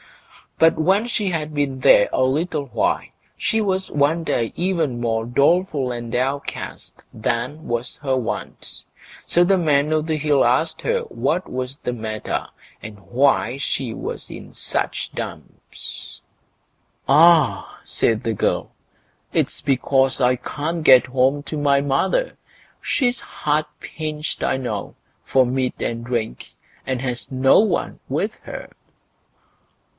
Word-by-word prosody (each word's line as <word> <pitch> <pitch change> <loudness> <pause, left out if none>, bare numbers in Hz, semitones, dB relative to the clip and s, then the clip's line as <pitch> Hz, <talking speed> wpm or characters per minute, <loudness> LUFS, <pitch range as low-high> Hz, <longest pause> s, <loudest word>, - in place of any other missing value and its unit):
But 165 0 +5
when 195 +8 +3
she 210 -4 0
had 155 -3 -3
been 140 -2 -1
there 105 -5 +6
a 130 - +2
little 150 +3 0
while, - - 0 0.3
she 220 - +1
was 190 -2 0
one 150 +4 +2
day 115 -7 0
even 165 -9 0
more 115 -1 0
doleful 140 +1 +2
and 120 -1 -5
downcast 135 +4 -3
than 125 +7 -2
was 120 +1 -2
her 135 -3 0
wont. 125 - -4 0.4
So 175 - +3
the 190 +2 +3
Man 150 -3 +2
o' 155 - +2
the 155 0 -1
Hill 145 -2 +3
asked 130 +7 +1
her 475 0 0
what 185 - -1
was 130 +2 -4
the 125 - -3
matter, 110 -2 -4 0.3
and 105 -1 -9
why 130 -1 +2
she 135 -3 -2
was - - -6
in - - -10
such - - -2
dumps. - - -7 0.9
"Ah!" 160 +1 +4
said 110 -1 0
the 115 - 0
girl, - - -1 0.6
"it's - - 0
because 135 0 +2
I 125 0 +4
can't 155 +6 -4
get 130 -3 +7
home 130 +2 +2
to 155 - -5
my 140 -1 +3
mother. 145 - 0 0.4
She's 250 -3 +1
hard 150 +1 -1
pinched, 155 -1 -4
I 130 - +1
know, 110 -6 -4 0.3
for 130 - +3
meat 130 +1 -1
and 115 0 -2
drink, 115 - -3 0.3
and 130 -2 -1
has 125 -1 -4
no 130 0 +5
one 215 +1 0
with - - -1
her." - - -8
140 Hz, 140 wpm, -21 LUFS, 125-160 Hz, 0.9 s, get